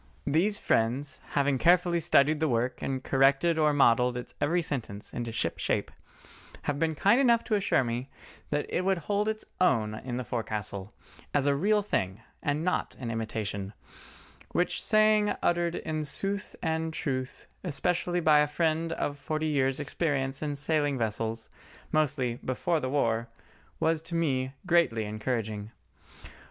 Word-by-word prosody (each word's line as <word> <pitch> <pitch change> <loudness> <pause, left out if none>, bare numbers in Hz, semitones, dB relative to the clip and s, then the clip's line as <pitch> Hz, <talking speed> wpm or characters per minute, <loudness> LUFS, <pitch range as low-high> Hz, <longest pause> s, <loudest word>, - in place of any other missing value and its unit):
These 175 +9 +2
friends 125 - 0
having 140 -2 +2
carefully 175 0 +4
studied 150 -1 +3
the 160 -1 +1
work 120 +1 0
and 130 -1 -2
corrected 140 +5 +3
or 150 -1 +4
modelled 125 -3 +4
its 125 - -6
every 170 +4 +2
sentence 115 -9 -5
into 120 -1 -3
ship 95 -7 -2
shape, - - -1 0.7
have 145 -1 -2
been 160 0 +1
kind 205 - +4
enough 235 -3 +4
to 220 - -3
assure 200 -9 +2
me 120 +2 -3 0.4
that 145 0 0
it - - -1
would 190 0 +2
hold 205 +5 -1
its 220 0 -2
own 115 -12 +2
in 120 +3 -5
the 125 - -2
forecastle, 105 -4 -4 0.4
as 140 -1 +3
a 145 - +4
real 205 +8 +2
thing, 95 - -1 0.2
and 150 +1 -1
not 180 - -1
an 120 -3 -4
imitation; 110 -3 -3 0.8
which 175 - 0
saying 215 -1 +4
uttered 175 0 +1
in 155 -1 -3
sooth 195 +7 -2
and 160 -1 -1
truth 130 -2 -3 0.2
especially 175 +2 0
by 155 -3 +5
a 150 - +3
friend 165 +2 0
of 145 -2 -3
forty 155 +1 -2
years' 135 -3 +1
experience 135 -2 -1
in 150 -2 -2
sailing 145 -1 0
vessels, 115 0 -2 0.4
mostly 135 -6 0
"before 160 +6 0
the 130 - -3
war," 115 -4 +1 0.5
was 160 -1 +1
to 170 +1 -6
me 135 -6 0
greatly 165 -11 +3
encouraging. 110 -1 -3
145 Hz, 155 wpm, -29 LUFS, 120-170 Hz, 0.8 s, by